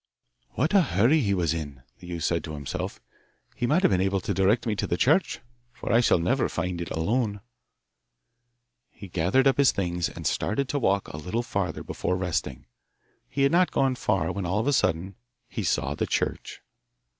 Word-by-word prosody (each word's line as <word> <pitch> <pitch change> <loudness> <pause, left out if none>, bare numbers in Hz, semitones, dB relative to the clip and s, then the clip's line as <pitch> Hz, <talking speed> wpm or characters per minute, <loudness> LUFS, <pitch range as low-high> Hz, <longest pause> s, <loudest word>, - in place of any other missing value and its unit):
'What 155 - 0
a 200 - +7
hurry 130 - +3
he 100 -7 +1
was 85 -3 +1
in!' 70 -5 -6 0.2
the 90 - -12
youth 85 -2 -4
said 85 0 0
to 80 -2 -6
himself. 70 -2 -5 0.6
'He 120 - -1
might 170 +8 +2
have - - +4
been 90 -1 +2
able 95 0 +1
to - - -2
direct 100 +5 +2
me 110 -2 0
to - - -1
the 85 - -1
church, 160 - +2 0.3
for 120 - -5
I 115 - +6
shall 120 - +4
never 120 +10 +1
find 90 0 -3
it 85 - -5
alone.' 105 +5 -1 1.5
He 100 - -11
gathered 90 +10 +2
up 135 0 +3
his 140 - +6
things, 90 -3 -1
and - - -9
started 130 +6 0
to 145 - 0
walk 100 -5 +1
a - - -7
little 90 +10 -2
farther - - -3
before 90 - -2
resting. 90 -3 -3 0.6
He 140 - 0
had 140 - +4
not 180 +2 +4
gone 135 -1 +1
far 105 -5 0
when 100 - -4
all 95 +3 0
of 110 - 0
a 145 - +2
sudden 95 -5 0 0.3
he - - -5
saw 70 +2 0
the - - -2
church! - - -2
100 Hz, 200 wpm, -26 LUFS, 85-130 Hz, 1.5 s, a